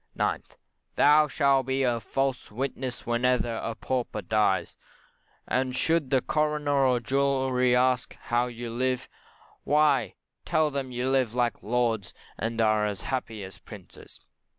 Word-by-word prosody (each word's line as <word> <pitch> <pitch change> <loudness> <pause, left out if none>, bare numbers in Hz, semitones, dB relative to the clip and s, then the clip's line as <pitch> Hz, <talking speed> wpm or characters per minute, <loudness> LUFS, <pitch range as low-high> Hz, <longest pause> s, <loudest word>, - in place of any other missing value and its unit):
9th, - - -2 0.4
Thou 150 +1 +5
shalt 135 -2 +2
be 135 +1 0
a 120 -2 +1
false 135 +1 -2
witness 130 +1 -4
whenever 120 0 +1
a 115 0 -4
Pauper 120 -5 -3
dies, 105 0 +1 0.7
and 130 0 0
should 160 +1 +1
the 130 -2 +3
coroner 150 -3 +1
or 125 -1 +2
jury 130 0 +1
ask 125 0 +1
you - - -27
how 120 +1 +1
you 120 -1 -6
live, 125 +1 -1 0.6
why 145 -5 +2 0.3
tell 155 -1 +1
them 135 -2 -4
you 125 +1 -2
live 130 -4 +1
like 120 -2 0
lords, 115 -4 -1 0.2
and 115 0 -3
are 110 -1 +3
as 100 -2 -4
happy 115 -5 -4
as 95 -1 -10
princes. - - -13
125 Hz, 145 wpm, -27 LUFS, 115-135 Hz, 0.7 s, Thou